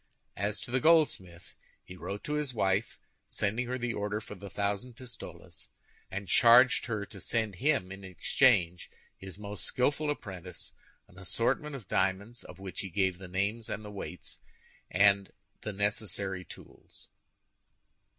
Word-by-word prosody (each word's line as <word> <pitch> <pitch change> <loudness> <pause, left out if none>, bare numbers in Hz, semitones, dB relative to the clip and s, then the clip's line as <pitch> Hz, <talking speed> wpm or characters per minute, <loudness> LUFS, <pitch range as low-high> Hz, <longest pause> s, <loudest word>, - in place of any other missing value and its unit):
As 100 +1 -1
to - - -6
the 130 - +3
goldsmith, 125 - +2 0.3
he 90 - -10
wrote 100 +2 -5
to 150 - -2
his 150 -4 -1
wife, 100 +1 +1 0.3
sending 110 +4 -1
her 125 +1 -1
the 120 -1 -1
order 105 0 -1
for 105 - -9
the 100 0 -9
thousand 100 +5 -2
pistoles, 125 -1 -10 0.4
and 95 0 -5
charging 120 +6 +7
her 110 -4 -2
to 100 - -11
send 110 -1 -1
him, 135 -9 +2
in 95 0 -8
exchange, 90 -1 +3 0.3
his 95 -1 -9
most 105 -1 -6
skillful 145 +4 +1
apprentice, 95 - -6 0.4
an 90 - -16
assortment 115 +9 0
of 115 -8 -9
diamonds, 100 +6 0
of 90 - -11
which 95 -1 -7
he 95 - -3
gave 95 0 +1
the 95 - -8
names 100 +5 -1
and 105 - -4
the 105 - -7
weight, 95 -3 -7 0.5
and 100 0 +4 0.3
the 110 - -3
necessary 100 -2 -1
tools. - - -14
100 Hz, 150 wpm, -31 LUFS, 95-120 Hz, 0.5 s, charging